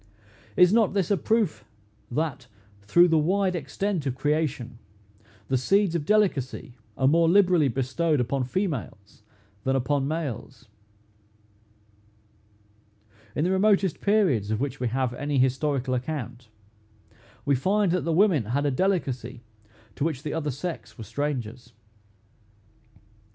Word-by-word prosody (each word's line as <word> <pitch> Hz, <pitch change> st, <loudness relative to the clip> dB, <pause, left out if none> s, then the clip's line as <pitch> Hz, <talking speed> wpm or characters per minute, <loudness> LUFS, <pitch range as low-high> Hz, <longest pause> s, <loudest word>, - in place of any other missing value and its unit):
Is 180 Hz, +2 st, +6 dB
not 220 Hz, -3 st, +3 dB
this 195 Hz, -1 st, 0 dB
a -, -, +5 dB
proof, 215 Hz, 0 st, 0 dB, 0.5 s
that, 150 Hz, +1 st, -3 dB, 0.3 s
through 170 Hz, -, +5 dB
the 165 Hz, -2 st, +3 dB
wide 185 Hz, +4 st, +1 dB
extent 170 Hz, +2 st, -2 dB
of 130 Hz, -, -2 dB
creation, 140 Hz, -5 st, -2 dB, 0.7 s
the 130 Hz, -1 st, +1 dB
seeds 195 Hz, +6 st, +2 dB
of 160 Hz, -4 st, -2 dB
delicacy 175 Hz, -, 0 dB, 0.2 s
are 130 Hz, -, +2 dB
more 165 Hz, +3 st, +4 dB
liberally 180 Hz, -5 st, +4 dB
bestowed 135 Hz, +5 st, 0 dB
upon 125 Hz, +2 st, -1 dB
females 130 Hz, -, -4 dB, 0.4 s
than 135 Hz, 0 st, +1 dB
upon 135 Hz, +1 st, 0 dB
males? 140 Hz, -5 st, -5 dB, 2.7 s
In 150 Hz, -, 0 dB
the 180 Hz, -, +1 dB
remotest 195 Hz, -2 st, +2 dB
periods 185 Hz, -, +2 dB
of 110 Hz, 0 st, -1 dB
which 135 Hz, 0 st, -3 dB
we 125 Hz, -, -1 dB
have 125 Hz, +1 st, -1 dB
any 145 Hz, +3 st, -2 dB
historical 130 Hz, 0 st, +1 dB
account, 125 Hz, -3 st, -4 dB, 1.0 s
we 140 Hz, -, +2 dB
find 195 Hz, +8 st, +1 dB
that 180 Hz, 0 st, +1 dB
the 165 Hz, -, -1 dB
women 170 Hz, -, +3 dB
had 135 Hz, +7 st, -1 dB
a 145 Hz, -, +2 dB
delicacy 130 Hz, -, -1 dB, 0.5 s
to -, -, -1 dB
which 150 Hz, -4 st, -2 dB
the 150 Hz, -, -3 dB
other 155 Hz, -2 st, -2 dB
sex 160 Hz, +6 st, -6 dB
were 115 Hz, -, -7 dB
strangers. 125 Hz, -3 st, -4 dB
145 Hz, 130 wpm, -26 LUFS, 130-180 Hz, 2.7 s, Is